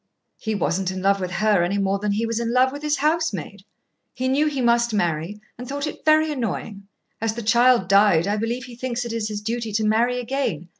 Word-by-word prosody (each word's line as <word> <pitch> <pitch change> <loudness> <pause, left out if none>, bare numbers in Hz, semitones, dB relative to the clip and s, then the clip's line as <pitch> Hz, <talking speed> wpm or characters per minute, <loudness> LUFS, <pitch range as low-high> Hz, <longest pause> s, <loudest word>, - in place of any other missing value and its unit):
"He 220 -1 -2
wasn't 185 0 -1
in 185 0 -5
love 200 0 +3
with 185 -1 -3
her 210 +1 +2
any 180 +4 0
more 195 0 0
than 205 0 -1
he 220 +3 0
was 230 0 -2
in 235 0 -2
love 255 +1 +3
with 285 +1 -7
his 300 0 0
housemaid. 320 +3 -1 0.5
He 255 +1 -2
knew 285 +4 +2
he 285 -3 -2
must 235 -2 +2
marry, 175 +1 -1 0.2
and 250 +1 -7
thought 285 +1 -3
it 305 - -7
very 310 0 +4
annoying. 215 -6 -4 0.3
As 225 -1 -1
the 235 - -5
child 235 -2 +4
died, 195 -4 +4
I 205 +1 0
believe 235 +3 -2
he 245 -2 -10
thinks 245 0 -3
it 235 - -5
his 215 -2 -3
duty 225 +1 -3
to 215 +1 0
marry 235 +3 +2
again. 235 - -3
230 Hz, 220 wpm, -23 LUFS, 200-255 Hz, 0.5 s, very